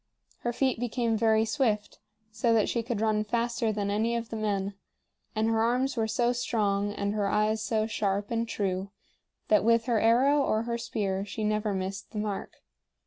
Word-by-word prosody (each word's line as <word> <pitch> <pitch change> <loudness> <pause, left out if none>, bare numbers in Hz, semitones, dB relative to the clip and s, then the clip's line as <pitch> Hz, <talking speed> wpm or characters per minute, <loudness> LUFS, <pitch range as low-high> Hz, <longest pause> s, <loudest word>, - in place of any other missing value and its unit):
Her 240 - -1
feet 255 0 0
became 235 -1 0
very 220 0 +3
swift, 220 -3 -1 0.3
so 230 +2 +2
that 215 - +3
she 235 - 0
could 230 -2 -3
run 215 -1 +2
faster 235 +1 0
than 205 -1 -2
any 225 +3 +1
of 230 -1 -3
the - - -5
men; 200 -2 -1 0.6
and 215 +1 +1
her 225 0 +2
arms 250 +4 +1
were 225 -2 0
so 235 +2 +1
strong 205 -4 0
and 200 0 -2
her 205 -2 0
eyes 215 +2 +1
so 220 -1 0
sharp 205 -2 -1
and 230 0 0
true 190 -1 -2 0.6
that 210 - +5
with 230 +1 +3
her 235 -3 +2
arrow 260 +6 +4
or 220 -5 +1
her 235 0 -3
spear 195 -4 -2
she 215 +2 -5
never 210 -1 0
missed 190 +1 -4
the - - -5
mark. 210 -2 -4
220 Hz, 190 wpm, -28 LUFS, 210-235 Hz, 0.6 s, that